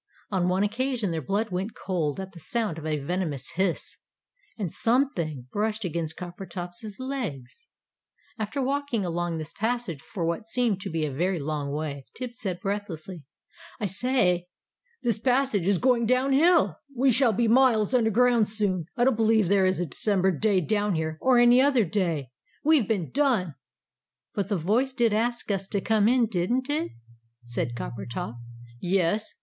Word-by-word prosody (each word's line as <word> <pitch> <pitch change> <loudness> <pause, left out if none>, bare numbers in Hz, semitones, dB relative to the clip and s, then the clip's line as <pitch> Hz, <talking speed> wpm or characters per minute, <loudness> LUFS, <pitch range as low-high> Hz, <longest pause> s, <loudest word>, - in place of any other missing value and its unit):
On 185 -3 +1
one 185 +2 +2
occasion 230 -1 -1
their 160 -1 -2
blood 200 - -1
went 190 +4 -3
cold 165 -6 -2
at 190 0 -6
the 170 - -12
sound 210 -1 -2
of 160 - -6
a 155 -1 0
venomous 150 -1 -3
hiss! 185 -2 -1 0.6
And 195 -7 -3
"something" 185 - +1
brushed 215 +1 -1
against 160 -2 -3
Coppertop's 180 +2 -7
legs. 260 - -5 0.7
After 220 +6 -2
walking 275 -6 -1
along 175 -1 -2
this 155 -1 -7
passage 225 - -2
for 180 -7 -4
what 170 +7 -2
seemed 225 -5 0
to 195 - -4
be 160 -1 -1
a 145 - -3
very 180 +6 0
long 145 -1 -3
way, 145 -2 -4
Tibbs 250 -1 -6
said 185 -6 -2
breathlessly 190 -5 -5 0.5
"I 210 - -1
say! 190 -4 +1 0.6
This 235 -4 +1
passage 250 -6 +1
is 200 -1 +4
going 245 +1 +2
down 255 +3 +2
hill! 330 +4 +4 0.2
We 260 +2 +4
shall 245 0 +5
be 230 +3 +1
miles 235 -2 +4
underground, 235 -1 +3
soon. 195 -6 -1
I 240 - +3
don't 260 -1 +4
believe 220 -3 +3
there 195 -1 +4
is 185 -1 0
a 175 - 0
December 190 +4 +2
day 190 +3 +2
down 205 +2 0
here, 160 0 -2
or 260 -1 +4
any 240 +1 +6
other 265 -5 +4
day. 165 - -1 0.3
We 315 0 +5
have 220 - -2
been 195 -8 -1
done!" 245 - +1 0.8
"But 200 -1 -2
the 205 - +1
voice 225 +11 +1
did 235 -4 +2
ask 235 +1 0
us 195 -1 -2
to 200 - -1
come 215 +1 +2
in, 245 0 +4
didn't 235 +7 -1
it?" 305 +2 -1 0.5
said 120 0 -3
Coppertop. 120 0 -5 0.4
"Yes. 190 - 0
205 Hz, 170 wpm, -26 LUFS, 175-240 Hz, 0.8 s, any